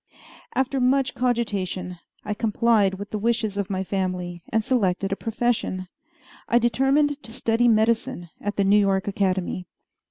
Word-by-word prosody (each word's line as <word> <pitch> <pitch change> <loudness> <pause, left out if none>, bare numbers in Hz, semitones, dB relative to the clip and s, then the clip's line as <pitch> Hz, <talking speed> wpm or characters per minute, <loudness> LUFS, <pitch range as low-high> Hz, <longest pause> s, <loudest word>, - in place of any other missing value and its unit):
After 265 +1 +1
much 260 +1 +2
cogitation, 200 -7 -2 0.3
I 210 - -1
complied 215 -2 +2
with 205 +2 -8
the 215 - -2
wishes 225 -2 0
of 200 -2 -2
my 190 -1 -1
family, 180 -2 -3
and 220 -1 +1
selected 195 -6 +1
a - - +1
profession. 220 -5 -1 0.6
I 235 - +4
determined 270 +5 +2
to 225 - -10
study 230 0 +1
medicine 220 -4 +1
at 205 0 -3
the 200 - +2
New 200 +2 +5
York 195 -1 +1
Academy. 185 -2 -1
210 Hz, 150 wpm, -24 LUFS, 190-240 Hz, 0.6 s, New